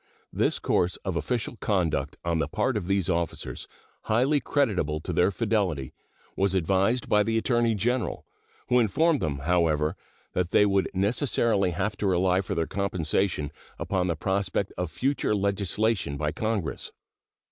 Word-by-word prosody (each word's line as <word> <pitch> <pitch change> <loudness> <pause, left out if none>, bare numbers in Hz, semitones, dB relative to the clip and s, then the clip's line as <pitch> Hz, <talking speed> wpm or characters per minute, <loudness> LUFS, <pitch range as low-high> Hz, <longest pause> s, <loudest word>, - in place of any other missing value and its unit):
This - - +1
course 90 +1 +1
of 95 -3 -2
official 120 +5 -2
conduct 80 -10 0
on 85 -1 +1
the - - 0
part 130 - 0
of 100 -5 -2
these 95 -2 +1
officers, 85 -2 -2 0.4
highly 130 +7 +3
creditable 100 - 0
to - - -4
their 90 - +3
fidelity, 100 - -1 0.4
was 95 0 +1
advised 95 +7 +1
by 105 - +4
the 115 +2 +1
Attorney 120 -1 +2
General, 120 +3 -1 0.4
who 125 - +5
informed 150 - +3
them, 75 -3 -2
however, 80 -3 +2 0.4
that 90 -1 0
they 105 - +5
would 100 -1 +2
necessarily 105 -1 +2
have 100 +5 -2
to 100 - -1
rely 90 0 +2
for 95 - -4
their 85 - +1
compensation 95 -5 -1 0.3
upon 95 -2 -1
the 85 - 0
prospect 95 +3 -1
of 90 -2 -3
future 135 - 0
legislation 100 -4 0
by 75 +1 -1
Congress. 110 -5 -3
95 Hz, 150 wpm, -27 LUFS, 85-110 Hz, 0.4 s, who